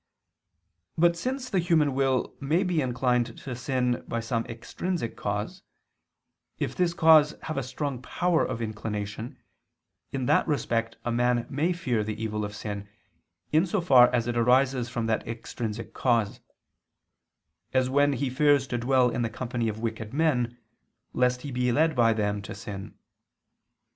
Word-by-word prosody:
But 170 +1 +4
since 255 +7 -3
the 195 - +1
human 160 -5 +2
will 130 -1 +1
may 155 +7 +1
be 180 -4 +1
inclined 125 -2 0
to 130 -3 -6
sin 125 -1 -1
by 115 - -2
an 115 -1 0
extrinsic 115 +4 -4
cause; 105 - -3 1.0
if - - -2
this 175 -2 +1
cause 155 -2 +6
have 155 - -4
a 135 - 0
strong 130 0 -4
power 175 +5 +1
of 115 -2 -3
inclination, 110 +3 -5 0.7
in 130 -2 -2
that - - +3
respect 115 -6 -1
a 120 - 0
man 120 0 +1
may 155 +6 +1
fear 125 -11 -1
the 110 0 -4
evil 105 -1 -2
of 105 0 -5
sin, 100 -1 -6 0.6
in 160 +5 +3
so 200 +4 0
far 130 -8 +6
as 120 -2 +1
it 120 0 -2
arises 125 +1 +3
from 120 -2 -2
that 110 -1 -1
extrinsic 115 -1 -5
cause: 115 -5 +1 1.3
as 130 -1 +2
when 145 +2 +3
he 135 0 -2
fears 145 0 +3
to 125 -2 -3
dwell 125 +1 +3
in 120 - -2
the 115 - 0
company 120 -1 -2
of 110 +1 -6
wicked 110 +1 -4
men, 125 -7 +1 0.6
lest 125 0 +1
he 145 - -5
be 125 0 +1
led 155 +5 +2
by 115 -2 +4
them 105 -2 -1
to 100 - -8
sin. 100 +1 -8
125 Hz, 160 wpm, -27 LUFS, 115-145 Hz, 1.3 s, cause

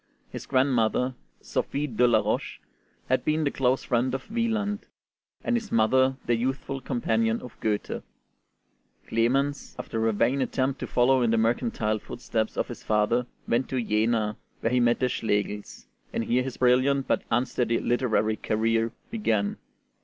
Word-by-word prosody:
His - - -7
grandmother, 130 -1 +2 0.3
Sophie 145 +1 -2
de 125 -3 +2
la 110 -2 +4
Roche, - - -2 0.5
had 130 - +1
been 155 +1 +1
the 140 - +1
close 130 0 +1
friend 125 +1 +1
of 135 - -7
Wieland, 220 -3 -1 0.6
and 245 - +1
his 225 -3 -3
mother 130 +4 +3
the 120 - +2
youthful 135 +3 -2
companion 115 -3 0
of 125 - -11
Goethe. 105 -2 -2 1.1
Clemens, 135 +5 0
after 115 -1 -2
a - - +3
vain 130 +6 +1
attempt 130 +1 0
to - - -4
follow 130 +1 +3
in 120 - +2
the 115 - +3
mercantile 110 - +1
footsteps 110 0 -3
of - - 0
his - - -7
father, 110 +3 +1 0.2
went 120 +3 +1
to 130 - -1
Jena, 110 -1 +1 0.2
where 115 - 0
he 125 - +4
met 120 -1 +3
the 130 - +2
Schlegels; 105 -3 -2 0.3
and - - -1
here 125 +2 +2
his 130 0 -5
brilliant 130 +2 +3
but - - +2
unsteady 120 -1 +1
literary 110 -3 +1
career 115 +1 +1 0.2
began. 110 - 0
120 Hz, 155 wpm, -27 LUFS, 115-135 Hz, 1.1 s, la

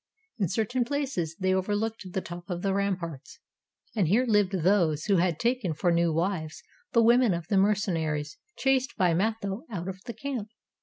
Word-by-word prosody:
In 195 - +2
certain 225 +7 0
places 255 - -2
they 185 0 +2
overlooked 205 +1 -1
the 190 - -2
top 175 +1 -9
of 175 -1 -3
the 195 -1 +1
ramparts, 180 -7 -3 0.6
and 200 -7 +2
here 225 +9 +3
lived 210 -5 +3
those 170 -4 +2
who 200 -2 +3
had 170 -2 +1
taken 235 -9 0
for 175 +3 +1
new 170 0 +2
wives 165 -1 -2 0.3
the 230 - +4
women 235 -3 +5
of 170 -1 -5
the 200 - +2
mercenaries 165 -7 0 0.2
chased 270 0 +1
by 180 -3 +3
Matho 200 +2 -1
out 180 -5 -5
of 190 0 -5
the 235 - -4
camp. 255 -7 -4
190 Hz, 175 wpm, -28 LUFS, 170-220 Hz, 0.6 s, women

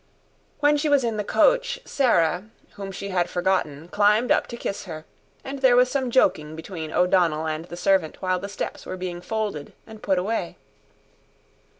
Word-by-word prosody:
When 295 0 +4
she 300 +1 0
was 285 -2 +4
in 230 -2 -1
the 210 - -1
coach - - +2
Sarah, 180 - +2 0.3
whom 195 -1 -7
she 200 +1 -6
had 180 -2 0
forgotten 175 -4 -1
climbed 210 +5 +3
up - - +3
to 235 - -7
kiss 200 - -4
her; 160 -3 -8 0.4
and 275 +1 -6
there 260 -2 +5
was 250 +1 +4
some 265 -3 0
joking 155 -11 +2
between 160 -1 -7
O'Donnell 175 -3 +2
and 155 +1 -3
the 175 - -9
servant 185 -3 +1
while 185 -1 0
the 200 - -6
steps 200 - -5
were 185 - -6
being 180 -1 -5
folded 205 -6 -4
and 220 -1 -12
put 190 -2 +1
away. 210 +5 -2
195 Hz, 180 wpm, -24 LUFS, 175-235 Hz, 0.4 s, there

